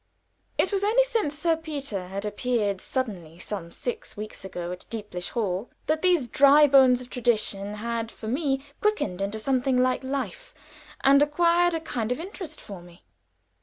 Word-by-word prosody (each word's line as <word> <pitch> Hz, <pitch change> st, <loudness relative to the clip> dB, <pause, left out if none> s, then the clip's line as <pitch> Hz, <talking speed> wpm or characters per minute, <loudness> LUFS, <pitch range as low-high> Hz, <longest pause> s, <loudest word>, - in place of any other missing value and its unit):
It 375 Hz, -, +2 dB
was 400 Hz, -1 st, 0 dB
only 455 Hz, +5 st, +4 dB
since 445 Hz, -12 st, -1 dB
Sir 330 Hz, +2 st, +2 dB
Peter 280 Hz, -, -4 dB
had 195 Hz, +2 st, -5 dB
appeared 210 Hz, -2 st, -1 dB
suddenly 185 Hz, -, -4 dB
some 175 Hz, -2 st, -6 dB
six 245 Hz, +1 st, -5 dB
weeks 215 Hz, -1 st, -7 dB
ago 180 Hz, -2 st, -5 dB
at 180 Hz, -, -8 dB
Deeplish 205 Hz, -6 st, -4 dB
Hall, 205 Hz, -2 st, -2 dB, 0.2 s
that 310 Hz, +1 st, 0 dB
these 355 Hz, -8 st, +3 dB
dry 280 Hz, +4 st, +6 dB
bones 260 Hz, -3 st, +5 dB
of 250 Hz, -, -16 dB
tradition 210 Hz, -4 st, 0 dB
had 230 Hz, +1 st, -3 dB
for 220 Hz, -, -9 dB
me 270 Hz, +2 st, -1 dB, 0.2 s
quickened 420 Hz, -, 0 dB
into 200 Hz, +2 st, -2 dB
something 255 Hz, +2 st, +1 dB
like 255 Hz, +1 st, +2 dB
life, 280 Hz, -, -4 dB, 0.5 s
and 280 Hz, +1 st, +6 dB
had 290 Hz, -, +3 dB
acquired 345 Hz, +2 st, +3 dB
a -, -, -1 dB
kind 245 Hz, -8 st, -3 dB
of 250 Hz, -, -1 dB
interest 345 Hz, -3 st, -7 dB
for 195 Hz, -4 st, -9 dB
me. 175 Hz, 0 st, -17 dB
250 Hz, 170 wpm, -26 LUFS, 205-300 Hz, 0.5 s, dry